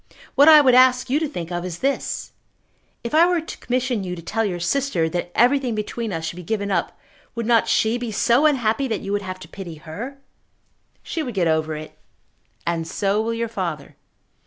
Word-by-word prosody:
What 285 +3 +7
I 305 -1 +9
would 260 -3 +4
ask 255 0 +5
you 290 - +3
to 315 - -1
think 175 - -6
of 175 0 -3
is 180 -2 -5
this. 275 +6 -2 0.7
If 235 - -5
I 330 +3 +6
were 355 -1 +2
to 325 - -8
commission 250 -3 -1
you 180 -1 -4
to 170 - -9
tell 225 +6 -1
your 185 -5 -2
sister 185 -3 0
that 175 +1 -3
everything 250 -1 +3
between 215 +1 -3
us 165 -2 -3
should 170 - -5
be - - -6
given 200 +2 -2
up, 170 -3 -1 0.4
would 235 -1 -3
not 230 -1 +3
she 225 +2 +2
be 240 -2 -4
so 240 +7 +3
unhappy 265 -2 +1
that 220 -4 -2
you 195 - -5
would 205 0 0
have 185 -1 -6
to - - -9
pity 180 -5 -8
her?" 205 - -8 0.9
"She 330 - -3
would 250 -7 -5
get 180 -3 +2
over 160 -1 0
it." 155 0 -9 0.7
"And 165 -1 -1
so 200 +4 0
will 230 +1 -2
your 230 0 -2
father." 175 -10 -5
220 Hz, 210 wpm, -22 LUFS, 175-255 Hz, 0.9 s, I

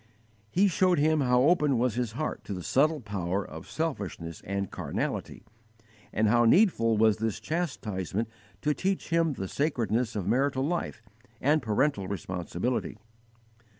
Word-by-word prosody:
He 195 - +3
showed 185 0 +3
him 155 +1 +3
how 125 -1 +3
open 150 -4 +3
was 125 -1 +1
his 120 -2 -2
heart 155 +6 -3
to 100 - -4
the 90 - -6
subtle 150 - +2
power 100 -3 -2
of 80 +1 -10
selfishness 100 - -4
and 100 0 -2
carnality, - - -4 0.7
and 110 0 +2
how 120 +2 +4
needful 115 - +4
was 110 -1 +4
this 110 -1 -2
chastisement 110 - -2 0.4
to 150 0 +2
teach 190 +4 -2
him 165 -2 +2
the 95 -7 -4
sacredness 120 - 0
of 100 -4 -2
marital 130 +5 +1
life 165 -8 -3 0.4
and 150 +3 +3
parental 115 -2 +1
responsibility. 95 +4 -3
120 Hz, 145 wpm, -28 LUFS, 100-150 Hz, 0.7 s, how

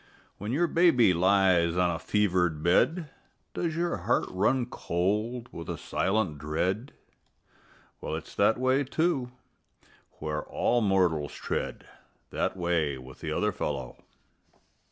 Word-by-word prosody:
When 105 +3 -4
your 160 +7 +2
baby 165 - +4
lies 90 -2 +3
on 90 -1 +3
a 80 - -3
fevered 90 -6 +1
bed, 140 - +2 0.4
Does 165 -3 -2
your 170 +1 0
heart - - +1
run 110 +7 +1
cold 110 +3 -2
with 85 - -8
a - - -3
silent 95 -7 -1
dread? 90 - -2 1.1
Well, - - -3
it's 80 - -8
that 105 +3 +3
way, 130 +2 +2
too, 140 -2 0 0.8
where 75 0 -4
all 120 0 0
mortals 90 -8 +1
tread - - -4 0.4
That - - -1
way 85 -6 0
with 65 0 -12
the - - -4
other - - +1
fellow. 65 -4 -5
95 Hz, 130 wpm, -28 LUFS, 85-125 Hz, 1.1 s, baby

